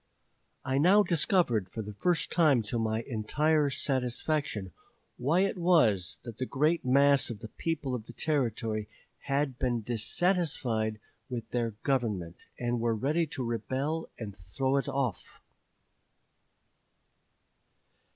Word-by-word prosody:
"I 135 0 +1
now 190 +7 +6
discovered 165 - +2
for 110 +3 -5
the 105 +1 -7
first 170 - 0
time 150 -9 +4
to 115 +2 -2
my 110 0 -1
entire 145 +6 +1
satisfaction 130 - -1 0.5
why 155 +9 +2
it 195 -1 0
was 120 - +3
that 115 -2 -9
the 130 - -2
great 155 +5 +1
mass 140 +1 +4
of 115 - -5
the 110 - -8
people 145 -3 -3
of 115 -3 -4
the 120 - -10
Territory 115 -6 -1 0.4
had 140 -2 0
been 120 -3 0
dissatisfied 120 - 0 0.3
with 120 -3 -4
their 115 -3 -1
government, 105 -11 -1
and 120 -1 -1
were 115 0 +1
ready 150 +8 0
to 135 - -4
rebel 130 +8 -2
and 105 -4 -7
throw 130 +10 -1
it 140 - -1
off." 135 -8 -3
130 Hz, 130 wpm, -30 LUFS, 110-150 Hz, 0.5 s, now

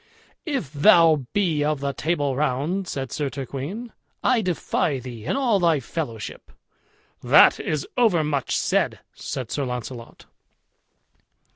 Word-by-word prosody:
"If 260 - -3
thou 160 - +5
be 170 -7 +1
of 150 -1 0
the 140 0 -2
Table 145 -4 -1
Round," 150 +7 -1
said 135 -4 -4
Sir 145 -2 -2
Turquine, 140 - -6 0.3
"I 250 -3 +3
defy 170 -6 -1
thee 120 -3 -9
and - - 0
all 240 -7 +2
thy 165 -4 +3
fellowship." 120 -5 -6 0.7
"That - - +6
is 150 -2 -2
overmuch 155 - +1
said," - - +1 0.2
said 130 -4 -6
Sir 145 - -1
Launcelot. 125 -1 -6
150 Hz, 125 wpm, -23 LUFS, 135-175 Hz, 0.7 s, That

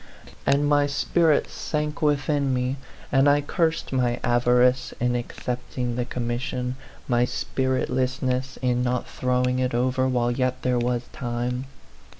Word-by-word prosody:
And 145 +1 +3
my 145 -1 +3
spirit 155 +2 +2
sank 150 -1 -3
within 145 -2 +1
me, 125 +2 -1 0.3
and 135 +1 +5
I 145 +1 +4
cursed 160 0 -1
my 125 -2 +1
avarice 125 +1 +3
in 125 0 +1
accepting 125 0 -3
the 125 0 -1
commission, 125 +1 -3 0.3
my 120 -1 +3
spiritlessness 130 0 -1
in 125 -1 +2
not 125 0 0
throwing 125 0 0
it 125 -1 0
over 130 +1 +1
while 120 -2 +1
yet 130 +1 -1
there 125 -1 +2
was 120 0 0
time. 125 +1 -3
125 Hz, 135 wpm, -25 LUFS, 125-135 Hz, 0.3 s, and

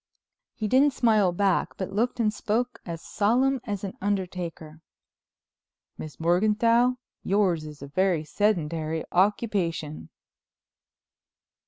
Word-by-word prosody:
He 215 - -2
didn't 270 +5 +4
smile 215 -6 +3
back 190 +1 0
but 190 0 -4
looked 240 +4 0
and 215 -2 +2
spoke 240 +4 -2
as 165 -1 -6
solemn 255 +5 +1
as 205 -3 -4
an 195 - -4
undertaker. 180 -5 -4 1.1
"Miss 155 -1 -9
Morganthau, 220 +8 +3 0.3
yours 185 -6 +1
is 150 -2 -10
a - - -7
very 175 +1 +1
sedentary 160 -4 -1
occupation." 180 - 0
195 Hz, 110 wpm, -26 LUFS, 165-220 Hz, 1.1 s, didn't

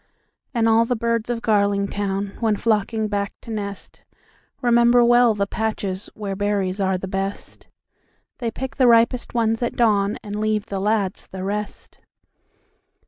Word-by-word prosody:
And 230 -4 +1
all 225 +1 +5
the 245 - 0
birds 230 0 -1
of 235 -1 -2
Garlingtown, 200 -1 0
When 220 -3 +2
flocking 220 0 0
back 200 -1 -2
to 230 - -8
nest, 200 -2 -6 0.6
Remember 240 0 +4
well 240 -1 +5
the 200 -1 0
patchesWhere 200 -1 -4
berries 200 -1 -1
are 190 -1 +1
the 190 - -6
best; 195 +1 -5 0.7
They 235 -3 -1
pick 260 +3 -6
the 255 - +4
ripest 235 +1 +3
ones 225 -1 +1
at 240 - -1
dawnAnd 205 -2 +1
leave 215 -1 0
the 200 -3 -4
lads 200 -1 -1
the 190 -1 -7
rest. 205 +2 -5
215 Hz, 140 wpm, -22 LUFS, 200-230 Hz, 0.7 s, all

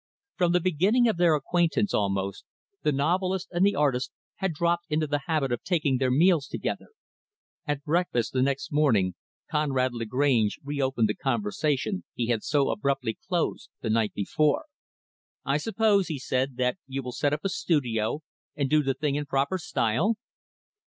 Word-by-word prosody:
From 175 -2 +2
the 180 - +4
beginning 185 +8 +3
of 220 - +1
their 170 -2 +4
acquaintance, 175 +6 +1
almost, 100 -1 -1 0.4
the 150 - +2
novelist 180 +6 0
and 175 +1 +1
the 200 +1 +4
artist 135 -4 +1 0.3
had 190 -2 -1
dropped 170 +2 0
into 155 0 +1
the 145 -1 -1
habit 155 -6 0
of 120 - -1
taking 150 -7 +1
their 130 -1 +2
meals 155 +2 +3
together. - - -4 0.8
At 145 -1 -2
breakfast, 155 -9 0
the 130 - +1
next 135 +3 -1
morning, 115 -12 +3 0.4
Conrad 135 -4 +1
Lagrange 115 -1 +1
reopened 135 -5 0
the 105 - 0
conversation 135 - -1
he 120 -1 -2
had 115 -3 +1
so 145 -2 +1
abruptly 135 - -1
closed 175 -3 -1
the 110 - -1
night 110 -1 +1
before. 150 - +1 0.8
"I 140 +1 +2
suppose," 210 +1 +2
he 160 -3 -3
said, 130 -1 -1
"that 125 +7 0
you 135 0 -4
will 125 - -5
set 145 +3 0
up 150 +1 -1
a - - +2
studio, 130 - 0 0.3
and 140 -2 -1
do 155 0 +5
the 135 -2 -1
thing 145 0 -1
in 145 0 -2
proper 140 +7 0
style?" 155 - +1
145 Hz, 165 wpm, -27 LUFS, 125-170 Hz, 0.8 s, do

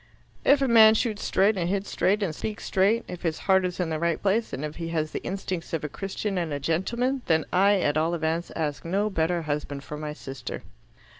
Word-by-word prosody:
"If 280 0 +5
a - - +2
man 220 -2 +7
shoots 220 -2 -1
straight 200 +2 +2
and 175 -1 -1
hits 200 +1 -2
straight 205 +2 +1
and 170 -5 -1
speaks 210 +6 -5
straight, 205 +5 +2
if 180 - -7
his 160 -2 -1
heart 190 -1 +4
is 180 0 -4
in 175 -3 -1
the 155 - -1
right 170 -1 0
place, 210 +3 +1
if 150 +2 -5
he 165 -1 -4
has 155 -2 -2
the - - -4
instincts 185 -3 -4
of 160 - -1
a 150 - -3
Christian 195 +3 -3
and 170 -3 -2
a 145 - -2
gentleman 235 - 0
then 160 -2 +2
I, 200 +2 +4
at 145 -1 +1
all 165 +2 +1
events, 165 +1 -2
ask 150 -3 -2
no 200 +5 0
better 170 -1 0
husband 145 -2 -3
for 150 - -7
my 150 0 -5
sister." 135 -3 -7
175 Hz, 225 wpm, -26 LUFS, 160-200 Hz, -, man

